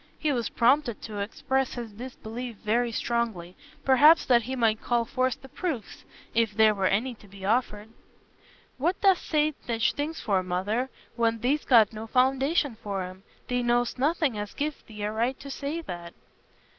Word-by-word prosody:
He 305 - 0
was 240 -4 -1
prompted 245 0 +2
to 210 -2 -6
express 265 +6 -1
his 235 -3 -6
disbelief 240 +1 -7
very 235 +3 +2
strongly—perhaps 235 - +2
that 240 -2 +5
he 260 +3 -4
might 225 -3 +2
call 240 -1 +1
forth 255 +1 -1
the - - -10
proofs, 265 - -5 0.3
if 225 -2 +1
there 220 -1 +6
were 195 -2 +1
any 230 +7 0
to 215 -2 -17
be 195 0 -10
offered. 215 -1 0 0.9
"What 345 +7 0
dost 385 -3 +4
say 305 -1 +2
such 230 -1 +1
things 305 +3 -3
for, 195 -4 +1
Mother, 195 +8 -1 0.3
when 230 -1 +1
thee'st 265 +6 0
got 225 -4 +6
no 220 +1 -7
foundation 265 +2 +2
for 200 -3 -3
'em? 185 +1 -9 0.3
Thee 245 0 0
know'st 240 +1 +1
nothing 290 -5 +1
as 205 0 -6
gives 295 0 -3
thee 210 -2 -9
a 210 - -1
right 235 +4 -1
to 275 - -8
say 290 +5 -3
that." 175 - -8
235 Hz, 170 wpm, -27 LUFS, 215-265 Hz, 0.9 s, there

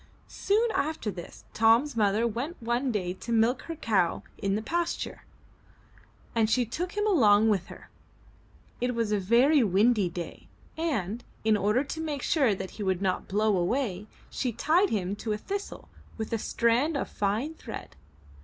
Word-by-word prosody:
Soon 445 +3 +1
after 305 - -1
this, 175 -2 -10
Tom's 230 +6 +4
mother 210 +1 +2
went 245 - -3
one 240 +3 0
day 185 -5 -2
to 225 +5 -8
milk 230 +3 +3
her 330 - -3
cow 200 - +1 0.2
in 195 -1 0
the 215 - -1
pasture, 340 +7 -3 1.1
and 225 -2 +2
she 245 +1 +2
took 345 +10 -4
him 415 0 0
along 220 - +5
with 195 -5 +1
her. - - -13 0.9
It 250 0 -1
was 230 -2 0
a 210 - +2
very 245 +9 +4
windy 205 0 +3
day, 170 0 -7 0.3
and, 240 - -2 0.2
in 220 0 +4
order 210 +6 +2
to 320 +3 -5
make 295 -4 -3
sure 265 -10 +2
that 190 0 -6
he - - -15
should 190 0 0
not 185 -1 -1
blow 210 +1 +2
away, 200 +1 -1 0.2
she 255 - -1
tied 340 - +2
him 195 -2 -1
to 215 0 -2
a - - -2
thistle 400 - -6 0.3
with 220 0 -4
a 225 - 0
strand 245 +9 +1
of - - -2
fine 215 +10 -1
thread. 320 - -9
230 Hz, 170 wpm, -28 LUFS, 205-280 Hz, 1.1 s, along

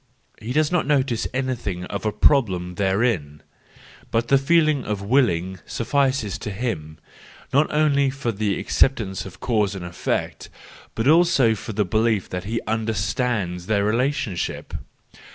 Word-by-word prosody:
He 115 - -5
does 155 +3 +2
not 180 -5 +1
notice 135 -5 +1
any¬ 130 0 -2
thing 95 -6 -5
of 100 +3 -4
a - - +1
problem 100 -7 +2
therein, 95 -6 0 0.7
but 115 +1 0
the 135 - +5
feeling 155 0 +3
of 105 -2 -3
willing 95 -6 +1
suffices 130 -4 0
to - - -5
him, 95 -8 -4 0.6
not 140 +3 +3
only 145 -2 +3
for 130 -3 -3
the 105 -1 -1
acceptance 105 -8 0
of 95 - -13
cause 105 -5 0
and 90 -2 -6
effect, 85 0 -3 0.5
but 115 +3 -1
also 155 -7 +5
for 110 +1 -6
the 105 0 +1
belief 110 +1 +1
that 90 +1 -5
he 115 +3 -2
understands 110 -4 -1
their 100 -2 +1
relationship. 115 -4 -1
110 Hz, 145 wpm, -23 LUFS, 95-135 Hz, 0.7 s, the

